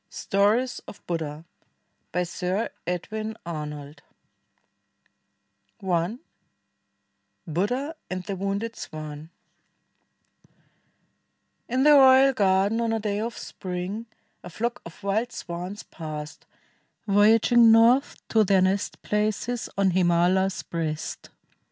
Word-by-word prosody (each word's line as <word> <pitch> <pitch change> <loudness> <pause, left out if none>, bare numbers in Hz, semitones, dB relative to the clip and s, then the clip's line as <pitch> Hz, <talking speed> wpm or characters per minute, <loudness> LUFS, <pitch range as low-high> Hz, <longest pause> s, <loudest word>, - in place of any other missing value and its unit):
STORIES 215 +6 +1
OF - - -12
BUDDHA 160 -2 -4 0.7
BY 180 +1 0
SIR 180 +4 -2 0.2
EDWIN 215 +5 -4
ARNOLD 150 -3 -6 1.8
I 180 +3 0 1.3
BUDDHA 245 - -1 0.2
AND 185 0 -4
THE 195 - -4
WOUNDED 200 +4 -3
SWAN 155 0 -8 2.4
In 255 +2 +1
the 300 - +7
royal 270 -1 +7
garden 200 0 +2
on 230 -1 0
a 225 - 0
clay 210 -1 -2
of 230 -1 -4
spring, 185 +5 -5 0.4
A 180 - -8
flock 235 +7 -3
of 170 +4 -15
wild 215 +5 0
swans 180 -2 -6
passed, 155 -2 -8 0.6
voyaging 225 +3 +5
north 235 +5 +4
To 220 -1 +4
their 190 -2 +3
nest 195 +2 -1
places 215 +3 -1
on 195 -1 +3
Himala's 180 +2 +2
breast. 160 -2 -4
195 Hz, 100 wpm, -25 LUFS, 175-225 Hz, 2.4 s, the